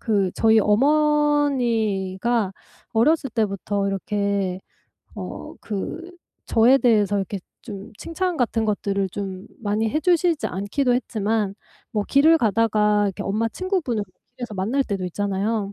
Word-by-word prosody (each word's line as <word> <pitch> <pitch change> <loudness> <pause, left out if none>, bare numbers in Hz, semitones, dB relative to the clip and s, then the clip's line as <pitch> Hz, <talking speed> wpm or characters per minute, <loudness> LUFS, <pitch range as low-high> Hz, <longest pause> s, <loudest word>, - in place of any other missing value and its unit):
그 200 -5 +1
저희 225 0 +4
어머니가 240 -6 +2 0.4
어렸을 270 +4 +2
때부터 200 -2 -1
이렇게 195 -1 -1 0.6
어 - - -7
그 330 - -5 0.4
저에 240 +4 +5
대해서 210 -5 +3
이렇게 195 0 -3 0.2
좀 205 -5 -9
칭찬 360 +1 -2
같은 230 -2 0
것들을 200 -2 -1
좀 190 -1 -6
많이 215 +1 0
해 305 - 0
주시지 345 -2 +2
않기도 245 +7 0
했지만 215 -4 -1 0.4
뭐 210 -2 0
길을 315 +4 +5
가다가 210 -2 +2
이렇게 195 - -4
엄마 220 +3 0
친구분을 345 - -2 0.3
길에서 240 -4 -6
만날 230 +9 0
때도 195 -2 -3
있잖아요. 200 +2 -2
220 Hz, 280 characters per minute, -23 LUFS, 200-260 Hz, 0.6 s, 저에